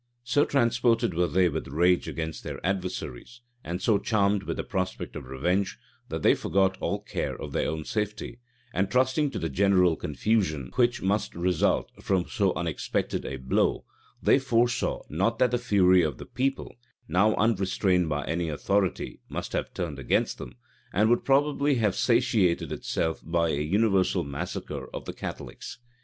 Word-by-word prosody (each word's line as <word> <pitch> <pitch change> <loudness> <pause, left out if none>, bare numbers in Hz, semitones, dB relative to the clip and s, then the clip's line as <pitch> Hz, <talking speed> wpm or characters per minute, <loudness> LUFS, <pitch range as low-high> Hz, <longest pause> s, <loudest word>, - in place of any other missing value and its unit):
So 125 +4 +2
transported 120 -4 +2
were 90 +1 +1
they 90 +4 +3
with 80 -1 -3
rage 85 +6 +2
against 80 -1 -4
their - - -5
adversaries, 95 - -4 0.2
and 90 +2 -4
so 105 -3 +3
charmed 100 -1 +1
with - - -4
the - - -2
prospect 95 -2 -3
of 65 - -7
revenge, 90 +9 -1 0.3
that - - -4
they - - +6
forgot 95 -1 +1
all - - -2
care - - -3
of - - -6
their - - 0
own 80 -1 -4
safety; 105 +2 -3 0.3
and 95 +1 0
trusting 130 +5 +2
to - - -5
the 80 - -2
general 90 +1 +3
confusion 75 - -1
which 120 -1 +2
must 100 +3 0
result 90 0 +1
from 95 -3 +1
so 100 -6 +1
unexpected 80 -3 -2
a 70 - -4
blow, 65 0 0 0.4
they - - +5
foresaw 120 -2 +1
not 95 +9 0
that 125 0 +3
the 120 - +1
fury 95 -6 +4
of 75 -6 -1
the - - -9
people, 135 +1 -2 0.3
now 105 +4 +3
unrestrained 95 -5 +1
by 75 -1 -2
any 85 0 -1
authority, 95 +5 -1
must - - -5
have - - -2
turned 75 -6 -4
against 65 - 0
them, - - -8 0.4
and 110 +4 +3
would 120 - +3
probably 140 +1 +2
have 110 -5 +2
satiated 115 -7 +2
itself 80 -1 -2
by 85 0 +1
a 70 -1 0
universal 95 +4 +2
massacre 70 0 -5
of - - -6
the - - -5
Catholics. - - -7
95 Hz, 165 wpm, -27 LUFS, 85-115 Hz, 0.4 s, they